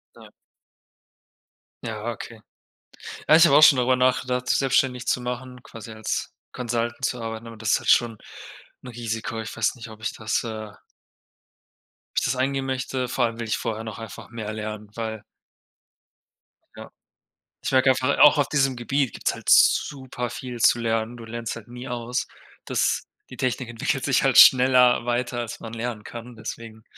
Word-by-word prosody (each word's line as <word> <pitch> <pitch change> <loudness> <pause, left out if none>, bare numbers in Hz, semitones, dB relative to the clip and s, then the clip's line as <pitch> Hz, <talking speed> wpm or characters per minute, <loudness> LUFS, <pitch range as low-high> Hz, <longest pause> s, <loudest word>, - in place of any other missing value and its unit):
Ja. - - -15 1.5
Ja, 110 +1 -4
okay. 115 -1 -9 0.9
Ja, 155 - +7
ich 165 +1 +8
habe 140 -4 +5
auch 150 - +7
schon 155 -3 +8
darüber 130 +1 +3
nachgedacht, 125 0 0
selbstständig 130 -2 +1
zu 125 - 0
machen, 125 0 -6
quasi 115 -2 -11
als 110 0 -4 0.2
Consultant 120 +1 -2
zu 125 -1 -2
arbeiten, 115 0 -6
aber 115 -1 -10
das 110 0 -1
ist - - +3
halt - - -4
schon 115 -3 +4 0.7
'n 130 - -10
Risiko. 115 -1 -4
Ich 110 - -7
weiß 110 +2 0
nicht, 115 -2 -10
ob 110 0 -13
ich 110 - -3
das, 110 +2 -2
äh 110 -2 -6 1.4
Ich - - +1
das - - 0
eingehen 135 +1 -1
möchte. 130 -1 -2
Vor 125 0 +1
allem 115 0 -4
will 115 - -4
ich 110 - 0
vorher 110 -1 -4
noch 110 -1 -7
einfach 115 - -9
mehr 110 -2 -6
lernen, 105 -1 -6
weil 110 -2 -5 1.5
Ja. - - -10 0.7
Ich - - -2
merke 130 0 +4
einfach 130 +2 +2
auch 150 0 +8
auf 145 - +2
diesem 135 -3 +1
Gebiet 135 +2 -1
gibt's - - -1
halt - - -6
super 130 -3 +3
viel 125 0 -7
zu 120 - +4
lernen. 115 +1 -1
Du 115 - -10
lernst 115 0 -5
halt 115 -1 -11
nie 125 +2 -9
aus, 120 0 -3 0.4
dass - - 0 0.2
die - - -11
Technik 125 -1 -2
entwickelt 115 -1 -2
sich - - +2
halt - - +3
schneller 125 -2 +7
weiter, 120 0 -1
als 120 -2 -5
man 115 0 -8
lernen 115 -2 -4
kann, 120 +2 -9
deswegen 110 0 -8
120 Hz, 175 wpm, -24 LUFS, 115-130 Hz, 1.5 s, ich